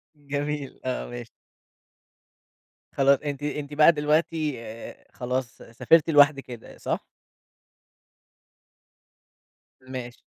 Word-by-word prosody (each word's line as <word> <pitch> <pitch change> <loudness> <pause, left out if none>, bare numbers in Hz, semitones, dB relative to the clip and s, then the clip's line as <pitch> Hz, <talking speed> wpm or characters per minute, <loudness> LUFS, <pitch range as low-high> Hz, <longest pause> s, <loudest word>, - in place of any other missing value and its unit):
جميل، 145 -1 -4
آه، 130 -1 -3
ماشي. 120 -2 -8 1.6
خلاص 140 0 +4
أنتِ 145 -1 -5
أنتِ 150 0 -4
بقى 150 +3 +7
دلوقتي 155 -1 0
آآ 115 0 -10
خلاص 125 -1 -3
سافرتِ 155 +8 +2
لوحدك 145 -2 +5
كده، 120 -3 -11
صح؟ - - -3 2.8
ماشي. 125 -2 -7
140 Hz, 85 wpm, -25 LUFS, 125-150 Hz, 2.8 s, بقى